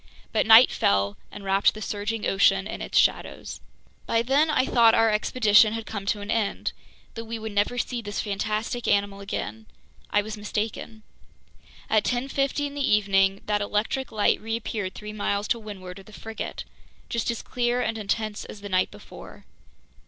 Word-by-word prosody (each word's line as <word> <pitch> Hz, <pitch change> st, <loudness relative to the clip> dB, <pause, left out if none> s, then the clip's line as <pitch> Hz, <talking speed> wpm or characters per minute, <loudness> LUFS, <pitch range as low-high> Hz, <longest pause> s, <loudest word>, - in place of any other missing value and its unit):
But 220 Hz, -, +2 dB
night 225 Hz, +3 st, +9 dB
fell 100 Hz, 0 st, +1 dB, 0.2 s
and 205 Hz, -, -9 dB
wrapped 195 Hz, +2 st, +3 dB
the -, -, -7 dB
surging 210 Hz, +2 st, -3 dB
ocean 195 Hz, 0 st, +3 dB
in -, -, -6 dB
its -, -, -2 dB
shadows. -, -, +1 dB, 0.5 s
By 230 Hz, 0 st, +2 dB
then 280 Hz, +6 st, +3 dB
I 280 Hz, -4 st, +2 dB
thought 230 Hz, -3 st, +5 dB
our 225 Hz, -1 st, +4 dB
expedition 215 Hz, 0 st, +4 dB
had 225 Hz, -1 st, -4 dB
come 200 Hz, -2 st, -6 dB
to 205 Hz, +1 st, 0 dB
an 205 Hz, +2 st, -4 dB
end, 225 Hz, -3 st, -1 dB, 0.4 s
that 230 Hz, -, -7 dB
we 230 Hz, +1 st, -5 dB
would 220 Hz, 0 st, -6 dB
never 205 Hz, +4 st, 0 dB
see 245 Hz, -1 st, -2 dB
this 205 Hz, -2 st, -5 dB
fantastic 215 Hz, +3 st, -2 dB
animal 200 Hz, 0 st, +1 dB
again. 110 Hz, -, -5 dB, 0.4 s
I 205 Hz, -, +2 dB
was 215 Hz, 0 st, -6 dB
mistaken. 215 Hz, +1 st, -4 dB, 0.8 s
At 215 Hz, -2 st, +3 dB
10:50 275 Hz, +3 st, -1 dB
in 285 Hz, -, -5 dB
the 285 Hz, -, -4 dB
evening, 195 Hz, -1 st, +2 dB
that 210 Hz, -1 st, 0 dB
electric 210 Hz, +6 st, -1 dB
light 210 Hz, -1 st, +2 dB
reappeared 220 Hz, -3 st, -3 dB
three 210 Hz, 0 st, -7 dB
miles 205 Hz, 0 st, -1 dB
to 235 Hz, -, +1 dB
windward 195 Hz, -4 st, -9 dB
of 195 Hz, -, -15 dB
the 215 Hz, -, -15 dB
frigate, 225 Hz, +1 st, -6 dB, 0.4 s
just 235 Hz, 0 st, -2 dB
as 235 Hz, -, -3 dB
clear 245 Hz, 0 st, 0 dB
and 225 Hz, -, -1 dB
intense 215 Hz, 0 st, -2 dB
as 205 Hz, -, -10 dB
the 205 Hz, -, -7 dB
night 185 Hz, -1 st, +2 dB
before. -, -, -13 dB
215 Hz, 175 wpm, -25 LUFS, 200-230 Hz, 0.8 s, night